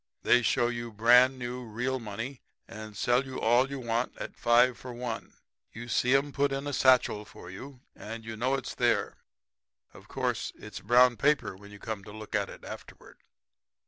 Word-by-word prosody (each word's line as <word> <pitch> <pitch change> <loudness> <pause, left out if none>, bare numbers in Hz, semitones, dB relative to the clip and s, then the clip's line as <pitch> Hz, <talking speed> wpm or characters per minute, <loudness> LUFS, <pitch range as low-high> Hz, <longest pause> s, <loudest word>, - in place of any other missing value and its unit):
They 125 - +5
show 120 +1 +2
you 120 -1 -4
brand 125 +4 +5
new 125 0 -5
real 125 +4 -2
money 115 +4 -6 0.3
and 110 -2 -9
sell 120 +5 +2
you 130 -1 -7
all 120 +4 +3
you 140 - -5
want 120 0 -2
at - - -7
five 120 +1 +4
for 125 - -9
one. 120 -1 -6 0.4
You 120 +2 -8
see 125 +2 +2
'em 140 +1 +1
put 140 +1 +1
it - - 0
in 135 +1 -4
a 145 - -3
satchel 130 -5 +3
for 90 -3 -12
you 130 +6 -10
and 115 +1 -8
know 130 +3 +1
it's 135 - -5
there. - - 0 0.8
Of - - -15
course - - -2
it's - - -9
brown 120 +2 +4
paper 145 -8 +1
when 100 +2 -14
you 105 - -12
come 105 -1 -6
to - - -10
look 110 0 -10
at - - 0
it - - -12
afterward.' - - -11
120 Hz, 190 wpm, -29 LUFS, 110-130 Hz, 0.8 s, They